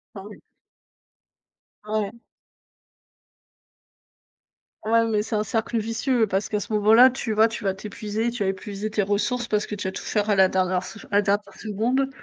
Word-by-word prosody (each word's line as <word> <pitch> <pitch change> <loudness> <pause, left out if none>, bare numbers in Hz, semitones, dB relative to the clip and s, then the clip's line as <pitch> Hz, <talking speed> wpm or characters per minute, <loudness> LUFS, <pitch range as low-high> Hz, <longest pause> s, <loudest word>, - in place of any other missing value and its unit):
Ah 195 - -7
oui. 210 - -12 1.4
Ah 210 - -10
ouais. 200 - -4 2.7
Ouais, 230 +1 +3
mais 215 -2 0
c'est 225 - -3
un 210 - +1
cercle 225 +1 -2
vicieux 230 +2 +1
parce 195 0 -1
qu'à 210 -1 -2
ce 210 - -8
moment-là, 220 +5 +6
tu 245 -3 -3
vois, 220 +1 +4
tu 225 -2 -7
vas 190 - +1
t'épuiser, 210 +3 -3
tu 235 -4 -3
vas 190 - +1
épuiser 200 +2 -4
tes 215 -1 0
ressources 210 +5 0
parce 210 0 +1
que 210 - -4
tu 200 -2 -3
vas - - -6
tout - - -7
faire 210 0 -1
à 205 - +4
la 190 - +6
dernière 185 0 0
f 220 - -10
à 200 - 0
la - - +5
dernière 205 +1 -1
seconde, 235 +6 -1
210 Hz, 185 wpm, -24 LUFS, 200-225 Hz, 2.7 s, moment-là